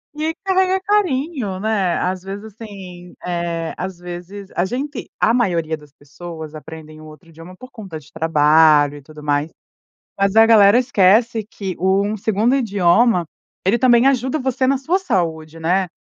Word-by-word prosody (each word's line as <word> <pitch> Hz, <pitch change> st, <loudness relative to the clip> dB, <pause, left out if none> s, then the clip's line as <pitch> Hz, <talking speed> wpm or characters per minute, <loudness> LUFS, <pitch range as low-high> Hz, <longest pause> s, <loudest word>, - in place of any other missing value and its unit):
Que 310 Hz, +2 st, -2 dB
carrega 380 Hz, 0 st, +2 dB
carinho, 300 Hz, -, -1 dB
né? 200 Hz, -4 st, 0 dB
Às 185 Hz, 0 st, -2 dB
vezes, 200 Hz, +2 st, -7 dB
assim, 195 Hz, -5 st, -11 dB
eh, 170 Hz, -2 st, -3 dB
às 185 Hz, 0 st, -5 dB
vezes 180 Hz, +3 st, -9 dB
a 175 Hz, -, +1 dB
gente, 265 Hz, +6 st, -5 dB
a 230 Hz, -, +3 dB
maioria 170 Hz, -10 st, 0 dB
das 150 Hz, -1 st, -18 dB
pessoas 155 Hz, +2 st, -10 dB
aprendem 155 Hz, 0 st, -11 dB
um -, -, -12 dB
outro 155 Hz, +3 st, -15 dB
idioma 165 Hz, +3 st, -13 dB
por 255 Hz, +4 st, -13 dB
conta 190 Hz, -9 st, -9 dB
de 145 Hz, -1 st, -20 dB
trabalho 150 Hz, -2 st, +4 dB
e -, -, -12 dB
tudo 150 Hz, +2 st, -14 dB
mais, 145 Hz, +1 st, -1 dB, 0.7 s
mas 195 Hz, +1 st, +1 dB
a 225 Hz, 0 st, +7 dB
galera 215 Hz, -1 st, +6 dB
esquece 225 Hz, -1 st, +3 dB
que 195 Hz, -5 st, -6 dB
o 190 Hz, +2 st, +1 dB
um 215 Hz, +1 st, -3 dB
segundo 220 Hz, +5 st, +1 dB
idioma, 205 Hz, -4 st, +2 dB, 0.4 s
ele 200 Hz, +5 st, +3 dB
também 240 Hz, +1 st, +4 dB
ajuda 265 Hz, +2 st, 0 dB
você 260 Hz, -1 st, -1 dB
na 275 Hz, +1 st, +2 dB
sua 325 Hz, +8 st, 0 dB
saúde, 165 Hz, -, -2 dB
né? 180 Hz, +4 st, +1 dB
190 Hz, 165 wpm, -19 LUFS, 165-235 Hz, 0.7 s, a